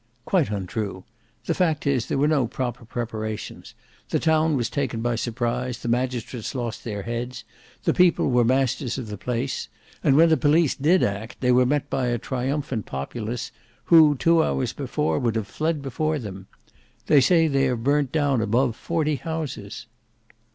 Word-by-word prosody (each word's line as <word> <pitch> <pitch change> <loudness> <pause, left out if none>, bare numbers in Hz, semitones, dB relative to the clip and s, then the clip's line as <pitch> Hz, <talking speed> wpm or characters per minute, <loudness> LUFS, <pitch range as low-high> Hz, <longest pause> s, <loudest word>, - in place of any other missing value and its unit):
"Quite 175 - +2
untrue: 100 -1 -4 0.4
the - - +1
fact 160 -5 0
is 135 -5 +1
there - - -1
were 145 +2 +3
no 145 -6 +2
proper 120 -1 -4
preparations; 110 -2 -5 0.3
the - - +1
town 160 -2 +2
was 120 -2 0
taken 130 -4 -2
by 120 +1 0
surprise, 120 +1 -2
the 120 - -7
magistrates 125 -1 -2
lost 120 -3 -4
their 105 -3 -4
heads; 120 0 -4 0.4
the - - +2
people 180 -6 +3
were 125 -1 +4
masters 130 0 +1
of 120 -5 -6
the 105 - -4
place; 125 +2 -2 0.4
and 135 - +4
when 165 +3 +6
the 160 - +4
police 155 0 +3
did 170 +7 +3
act, 100 +3 -3
they 125 -1 +3
were 125 0 +4
met 145 +1 0
by 130 -2 0
a 120 0 0
triumphant 130 -1 -3
populace, 110 - -4 0.4
who 155 -3 +8
two 165 +4 +3
hours 130 -5 -1
before 145 +2 -1
would 120 -4 0
have 110 -2 -1
fled 155 +6 -2
before 155 +3 -1
them. 100 -6 -8 0.6
They 145 - +5
say 165 +4 +4
they 135 -2 +2
have 125 -3 -1
burnt 140 0 +2
down 145 -5 +1
above 115 +3 +1
forty 155 -1 -1
houses." 160 -2 -5
130 Hz, 170 wpm, -24 LUFS, 115-150 Hz, 0.6 s, who